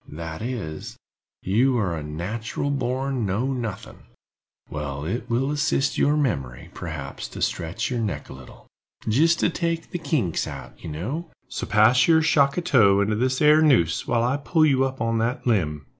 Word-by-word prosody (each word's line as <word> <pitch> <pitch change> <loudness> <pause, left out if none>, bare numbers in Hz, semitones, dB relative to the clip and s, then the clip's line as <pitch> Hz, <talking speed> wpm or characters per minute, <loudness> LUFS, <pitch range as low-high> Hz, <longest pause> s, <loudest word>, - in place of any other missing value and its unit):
"That 80 +2 -7
is, 110 -11 -5 0.5
you 125 +7 +2
are 95 -7 0
a 80 - -4
nat'ral 105 - -4
born 130 -1 -1
know 110 +7 0
nothing. 115 -6 -6 0.6
Well, 70 -1 -5
it 120 +7 -3
will 130 +4 +1
assist 145 -1 0
your 150 +1 +3
memory, 70 - -2
perhaps, 75 -5 -6
to - - -10
stretch 85 +9 -2
your 120 - -1
neck 110 -3 -3
a - - -9
little, 65 -1 -14 0.4
jist 160 +9 +3
to - - +3
take 165 -1 -2
the 175 - -3
kinks 140 - -1
out, - - -8
you - - -5
know; 130 - -4 0.2
so - - -5
pass 110 +4 +5
your 160 -1 +5
shock 140 -2 +3
of 180 - 0
tow 110 - +5
into 105 +1 +1
this 130 +5 0
'ere 150 +1 +6
noose, 120 - +3
while 115 -1 +1
I 125 +4 +1
pull 155 +3 +2
you 135 -3 +3
up 130 -2 -5
on 115 0 +1
that 120 +3 -1
limb." 75 - 0
120 Hz, 180 wpm, -24 LUFS, 90-140 Hz, 0.6 s, ere